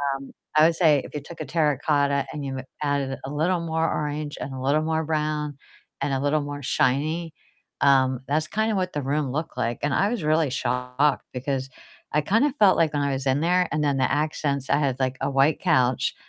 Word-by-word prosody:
um, 135 0 -9 0.3
I 155 - +7
would 165 0 +3
say 155 -5 +4
if - - -10
you 150 - -3
took 165 +4 -12
a - - -3
terracotta 145 -2 +2
and 150 -2 -5
you 135 -1 -4 0.2
added 140 -2 -1
a 135 - -5
little 165 +5 +1
more 160 -1 -1
orange, 150 0 -3
and 140 - -4
a 130 - -6
little 150 +2 +3
more 160 0 +1
brown, 150 -1 -1 0.5
and - - 0
a 135 - 0
little 150 +1 +2
more 145 0 -6
shiny, 150 +6 0 0.5
um, 130 -2 +4
that's 155 +2 0
kinda 220 +4 0
what 185 -1 -1
the 145 - -2
room 145 -3 0
looked 155 +4 -4
like, 115 0 -1
and 145 -1 +1
I 200 - +2
was 230 -7 -3
really 155 -1 +2
shocked 125 +2 0
because 135 +1 -3 0.4
I 150 - +2
kinda 225 - +2
felt 195 -3 +6
like 160 -2 +3
when 145 -1 0
I 140 -1 0
was 135 0 -3
in 135 +1 +2
there 180 +2 +2
and 155 -1 0
then 140 -2 +1
the 130 -1 +1
accents, 145 -2 -1
I - - +4
had, 135 -3 0
like, 130 -1 0
a 135 - 0
white 135 +2 +3
couch, 125 -1 +2
145 Hz, 215 wpm, -24 LUFS, 135-155 Hz, 0.5 s, I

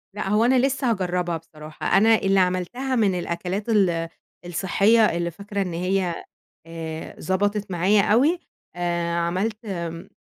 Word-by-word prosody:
لأ، 205 - -3
هو 210 +3 +3
أنا 255 +1 +4
لسّه 270 -1 0
هاجرّبها 180 -4 -1
بصراحة، 155 0 -3
أنا 225 +3 +6
اللي 195 -2 +2
عملتها 185 +9 0
من 200 -6 +2
الأكلات 180 +5 -3
ال 175 -6 +2 0.4
الصحّية، 200 +5 +3
اللي 170 0 -2
فاكرة 200 +3 -5
إن 180 -3 -3
هي 180 0 -1 0.4
آآ 160 -1 -7
ظبطت 205 +2 -1
معايا 185 +4 +3
أوي، 265 - +3 0.4
آآ 170 -1 -1
عملت 190 +7 -2
آمم، 170 -4 -5
190 Hz, 140 wpm, -23 LUFS, 170-210 Hz, 0.4 s, أنا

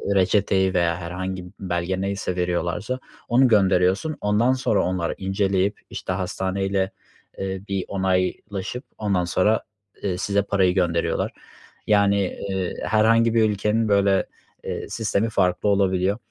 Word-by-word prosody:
reçeteyi 95 0 +2
veya 85 -2 +1
herhangi 90 +1 -5
belge 90 0 -2
neyse 100 -2 -2
veriyorlarsa 90 +7 -1 0.3
onu 125 +2 +5
gönderiyorsun. 95 - +3
Ondan 105 +5 +3
sonra 120 -6 +1
onları 90 -2 -1
inceleyip, 95 +1 0
işte, 90 - -4
hastaneyle, 95 +1 -1 0.5
eee, 95 -1 -3
bir 95 -2 -1
onaylaşıp 95 +3 -2
ondan 100 -4 0
sonra, 105 +5 +2 0.4
eee, 90 -3 -1
size 100 +1 +1
parayı 95 -3 +2
gönderiyorlar. 85 -2 0 0.6
Yani, 100 -1 +4 0.3
eee, 95 -2 -2
herhangi 115 +1 +3
bir 110 -1 +4
ülkenin 105 +2 0
böyle, 100 -1 +3 0.4
eee, - - -5
sistemi 110 0 0
farklı 90 0 +1
olabiliyor. 95 0 +2
95 Hz, 120 wpm, -23 LUFS, 90-105 Hz, 0.6 s, onu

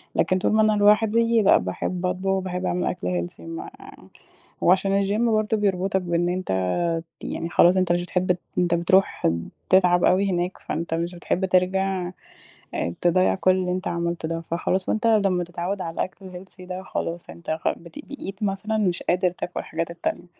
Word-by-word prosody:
لكن 185 - +2
طول - - +1
ما 220 - +4
أنا 215 0 +4
لوحدي، 220 +2 +4
لأ، 200 - +6
باحِب 175 - -3
أطبخ، 190 +1 0
باحِب 185 -1 -4
أعمل 180 - 0
أكل 90 -1 -2
healthy. - - -17
ما 165 0 -7 0.9
وعشان 190 +2 +3
الجيم 205 +4 +1
برضه، 215 0 +1
بيربطك 190 -2 0
بإن 175 0 0
أنت 95 - -1 0.5
ت - - -18
يعني 165 - -4
خلاص، 175 +2 +5
أنت 185 -2 +2
مش 175 0 +1
بتحِب 180 +1 0
ت 180 - -1 0.2
أنت 175 -1 +2
بتروح 190 +3 +2 0.4
تتعب 180 -2 +4
أوي 195 +2 +3
هناك، 175 +1 -1
فأنت 165 +1 -4
مش 170 +2 -2
بتحِب 175 +2 -1
ترجع 185 0 +1 0.6
آآ 85 - -1
تضيِّع 180 +1 +3
كل 185 0 +3
اللي 185 -1 0
أنت 185 +1 -2
عملته 170 -1 -2
ده. 165 0 -3
فخلاص، 180 +3 -2
وأنت 220 +1 +1
لمَّا 195 -5 +3
تتعوَّد 175 +3 -4
على 165 - -4
الأكل 190 +3 -4
الhealthy 185 +1 -11
ده، 185 +1 -6
خلاص، 170 -2 -4
أنت 170 - -7
خ 155 - 0
بت 175 +13 -12
بقيت 210 -8 -7
مثلًا 210 +2 -1
مش 185 -5 0
قادر 180 0 +1
تاكل 180 0 -5
الحاجات 165 +1 -4
التانية، 170 - -3
185 Hz, 180 wpm, -24 LUFS, 175-195 Hz, 0.9 s, لأ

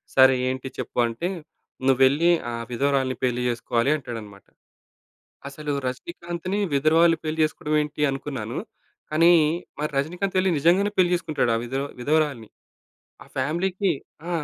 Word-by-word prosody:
సరే 130 0 +7 0.2
ఏంటి 130 0 -4
చెప్పు - - -4
అంటే, 115 +10 -3 0.6
నువ్వు 135 -1 +3
వెళ్లి 145 +6 +3 0.2
ఆ - - -5 0.2
విధవరాలిని 135 0 0
పెళ్లి 125 -1 +1
జేసుకోవాలి 120 +2 0
అంటాడన్నమాట. 110 -7 -9 1.0
అసలు 150 +1 -5 0.2
రజనీకాంత్‌ని 170 +8 -4
విధవరాలు 160 +4 +4
పెళ్లి 155 +1 -3
చేసుకోవడం 155 0 -1
ఏంటి 150 0 -6
అనుకున్నాను. 130 -5 -5 0.5
కానీ 165 +3 +5 0.5
మరి 150 0 -2
రజనీకాంత్ 180 +8 -2
వెళ్లి 185 0 +3
నిజంగానే 185 +7 +3
పెళ్లి 180 -1 +4
చేసుకుంటాడు 155 -8 0
ఆ - - +1
విదవ్ 135 +3 -3
విధవరాలుని. 145 -4 0 0.8
ఆ - - -19
ఫ్యామిలీ‌కి 185 +5 0 0.4
ఆ! - - -3
150 Hz, 130 wpm, -24 LUFS, 130-170 Hz, 1.0 s, సరే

